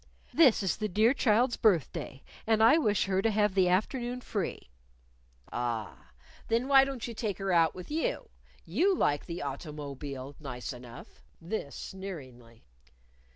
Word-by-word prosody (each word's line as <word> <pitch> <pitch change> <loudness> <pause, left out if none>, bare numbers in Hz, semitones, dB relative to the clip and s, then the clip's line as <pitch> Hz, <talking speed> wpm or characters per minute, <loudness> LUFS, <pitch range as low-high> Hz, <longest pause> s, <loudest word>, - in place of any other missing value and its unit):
"This 270 -10 +5
is 190 - 0
the 215 - -1
dear 215 +6 +3
child's 240 -1 +2
birthday, 160 - 0 0.2
and 220 -1 +4
I 235 +9 +7
wish 210 - +2
her 190 -1 +1
to 225 - +2
have 210 -2 +2
the 185 -2 +3
afternoon 240 +6 -1
free." 195 - -4 0.8
"A - - -6
a - - -1
ah! 115 - -4 0.4
Then 230 +3 +1
why 270 -1 +7
don't 270 -4 -5
you 235 - -6
take 210 -3 -3
her 195 -1 -2
out 165 -1 +4
with 185 +9 -9
you? 315 +1 -2 0.4
You 340 - +2
like 145 - 0
the 170 -1 -5
auto_mo_bile 140 -2 -6
nice 135 -3 -6
enough," 120 -1 -12 0.2
this 165 -5 -5
sneeringly. 130 - -9
190 Hz, 155 wpm, -30 LUFS, 140-225 Hz, 0.8 s, I